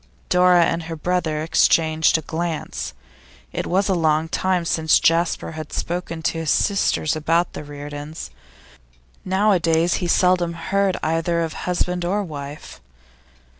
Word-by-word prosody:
Dora 180 -1 +5
and 165 - -1
her 165 - -4
brother 160 -2 -1
exchanged 160 0 +3
a - - -4
glance. 160 - -4 0.6
It - - -3
was 190 +2 +1
a 195 - +2
long 160 -2 +1
time 185 -1 0
since 160 -1 +3
Jasper 165 +1 +1
had 155 -2 -8
spoken 170 -2 -4
to 165 - -1
his 160 -2 -3
sisters 195 -6 +1
about 165 +3 0
the - - -7
Reardons; 145 +1 -8 0.9
nowadays 180 -4 +2
he 175 - -1
seldom 180 -1 +2
heard 190 +3 0
either 165 +1 0
of 165 -1 -2
husband 180 0 -2
or 200 +4 0
wife. 145 - -8
165 Hz, 135 wpm, -21 LUFS, 160-180 Hz, 0.9 s, Dora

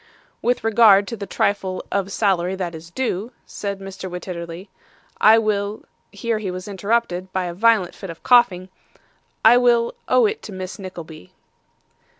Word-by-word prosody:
'With 245 +1 0
regard 215 -3 +5
to 235 - -4
the 200 -2 -7
trifle 190 -1 -1
of 200 0 -1
salary 190 -3 +1
that 180 -3 -4
is 165 +1 -10
due,' 225 +1 -3
said 200 -1 -5
Mr. 195 -1 -7
Wititterly, 175 0 -7 0.5
'I 220 +1 +7
will' 210 -1 -1 0.3
here 220 +2 -2
he 205 -3 -4
was 185 +1 -6
interrupted 200 -2 -1
by 185 -1 -1
a 175 - -4
violent 205 -2 +3
fit 195 - -9
of 165 - -10
coughing 205 -7 +4 0.8
'I 235 +2 +8
will 240 -1 +3
owe - - +4
it 430 +1 -1
to - - -9
Miss 185 +2 -7
Nickleby. 170 - -10
195 Hz, 155 wpm, -21 LUFS, 185-225 Hz, 0.8 s, I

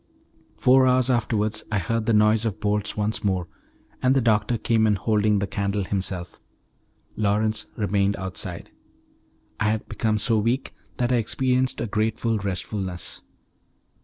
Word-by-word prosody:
Four 130 +1 +5
hours 130 0 +3
afterwards 110 -2 0
I 105 - +1
heard 110 +4 -1
the - - +3
noise 105 +1 +4
of 110 -3 -2
bolts 105 0 -1
once 105 +1 -1
more, 95 -4 0 0.5
and 130 +1 +3
the - - +4
doctor 115 -1 +2
came 110 0 +2
in 105 - +3
holding 105 +1 +2
the 100 - 0
candle 100 0 -2
himself. 95 -2 -3 0.8
Lawrence 110 +1 0
remained 100 -1 +1
outside. 95 -2 -6 0.9
I 110 - +2
had 110 0 -2
become 110 -1 0
so 110 +1 +2
weak 120 +5 -1 0.2
that 120 0 0
I 125 - +4
experienced 130 +2 0
a - - -1
grateful 110 +1 0
restfulness. 95 -2 -4
105 Hz, 145 wpm, -24 LUFS, 100-115 Hz, 0.9 s, Four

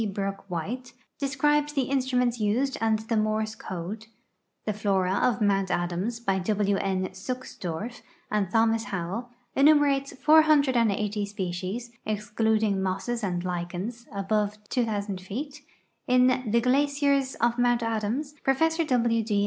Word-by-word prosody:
Brook 195 0 -3
White, 235 +9 -4 0.3
describes 295 +2 +1
the 275 -2 +1
instruments 250 -2 +1
used 240 +6 +1
and 220 -1 +3
the 220 +1 -3
Morse 215 0 0
code; 200 +3 -6 0.6
The 215 - 0
Flora 195 -3 +1
of 220 +1 +1
Mount 195 -2 +2
Adams, 180 +7 -1
by 195 -5 0
W. 200 +1 +1
N. 190 -1 -1
Suksdorf 210 -1 -5 0.3
and 205 -3 +1
Thomas 225 +1 +2
Howell, 195 +6 -4 0.3
enumerates 280 -1 +4
480 260 -10 +3
species 195 +4 -4
(excluding 215 -1 0
mosses 195 +5 -2
and 180 -3 -1
lichens) 180 +6 -4
above 205 +1 -1
2,000 205 -5 -1
feet; 280 +10 -6 0.5
in 250 -1 +3
The 235 +2 +3
Glaciers 280 +1 +2
of 235 +1 +1
Mount 240 -1 +3
Adams 230 +6 -2
Prof. 320 +5 +2
W. 235 -7 +2
D. 210 -2 0
225 Hz, 125 wpm, -27 LUFS, 195-255 Hz, 0.6 s, enumerates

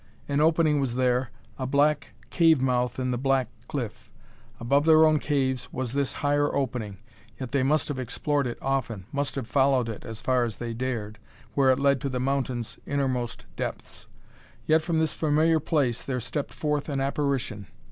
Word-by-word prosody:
An 145 +1 +1
opening 155 -2 +3
was 130 -4 -1
there, 125 0 +1 0.3
a 130 - -2
black 145 +2 +1 0.2
cave 165 -4 +5
mouth 125 -1 0
in 130 -1 -1
the 120 - -1
black 135 -2 +1 0.2
cliff. 120 -7 -5 0.5
Above 140 +5 +2
their 160 0 +7
own 155 -1 +4
caves, 130 -4 -1
was 130 -2 -3
this 140 -1 0
higher 145 0 +2
opening, 120 -7 -2 0.4
yet 130 -3 -5
they 140 - +2
must 150 +4 +2
have 145 -3 -3
explored 135 +3 -1
it 120 - -5
often 120 -8 -1
must 140 -1 -2
have 135 -3 -3
followed 135 -3 +3
it 110 -2 -6
as 115 -1 -7
far 130 0 +2
as 115 -4 -3
they 120 -1 -4
dared, 115 -3 -4 0.3
where 135 -2 +3
it 130 +1 +3
led 140 -1 +3
to 140 - -2
the 130 -1 -2
mountain's 130 -3 -2
innermost 130 -4 -1
depths. - - -6 0.6
Yet 160 +1 +4
from 165 0 -1
this 160 0 +1
familiar 160 +1 +2
place 140 -6 0
there 130 -2 -2
stepped 130 +5 -3
forth 150 -1 -1
an 140 -2 -1
apparition. 135 - -1
135 Hz, 180 wpm, -26 LUFS, 125-145 Hz, 0.6 s, their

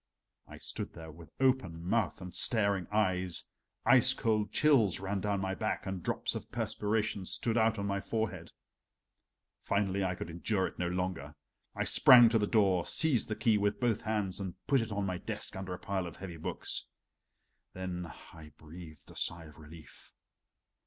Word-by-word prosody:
I - - -11
stood - - -6
there 80 -1 -10
with 80 +1 -14
open 130 -11 +1
mouth 95 +4 -1
and 90 -1 -8
staring 100 -5 +2
eyes, 95 -4 0 0.4
ice 130 +1 +6
cold 105 -2 0
chills 130 - +3
ran 95 0 -3
down 100 0 -1
my 95 0 -2
back, 90 - -3
and 95 -1 -4
drops - - -1
of - - -7
perspiration 105 -2 -2
stood 115 -2 0
out 110 -1 +2
on 100 - -3
my 100 -1 -2
forehead. 110 0 -3 1.1
Finally, 100 -1 0
I 90 -1 -1
could 85 - -7
endure 95 +3 -1
it - - -7
no 90 - 0
longer. 90 -5 -3 0.4
I - - -1
sprang 120 -2 +8
to 115 -1 +2
the 105 - 0
door, 95 -6 +2
seized 150 -8 +4
the 110 - -3
key 110 -2 +2
with 105 0 0
both 115 -3 0
hands 105 -4 -2
and 95 -3 -5
put 135 -3 +3
it 115 - -5
on 100 -1 -2
my 90 -2 -3
desk - - -6
under 95 -1 -6
a - - -10
pile 95 -2 -3
of 85 - -9
heavy 90 -3 -8
books. 80 - -4 0.9
Then 90 -2 -5 0.2
I 80 -3 -13
breathed 80 -1 -13
a - - -15
sigh 85 -1 -4
of 75 -1 -15
relief. 80 +1 -14
95 Hz, 180 wpm, -31 LUFS, 90-110 Hz, 1.1 s, sprang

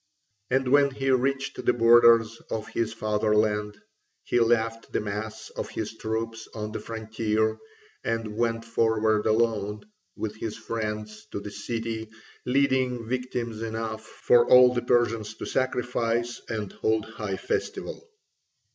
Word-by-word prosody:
And 130 0 +1
when 140 +1 +5
he 135 0 -1
reached 135 +1 0
the - - +3
borders 115 -1 +5
of 110 -1 -4
his 115 -1 -1
fatherland, 105 -1 0 0.4
he 120 - +1
left 115 -1 +1
the - - 0
mass 110 +1 -5
of - - -5
his 110 0 -4
troops 115 0 -4
on 105 -1 -4
the 110 - -4
frontier, 110 -1 -1 0.4
and 115 -2 -2
went 115 0 0
forward 110 -2 +2
alone 110 -2 +1 0.3
with 110 -1 -4
his 110 -1 -4
friends 105 -1 -5
to - - -2
the 105 0 -7
city, 110 +1 -4 0.4
leading 130 -2 +2
victims 120 -2 -3
enough 110 -1 -4
for 120 +2 +3
all 125 0 +8
the 120 - 0
Persians 115 -3 +1
to - - -6
sacrifice 120 -2 -1
and 110 -3 -3
hold 110 -1 0
high 105 -3 -4
festival. 460 - -4
115 Hz, 135 wpm, -26 LUFS, 110-120 Hz, 0.4 s, all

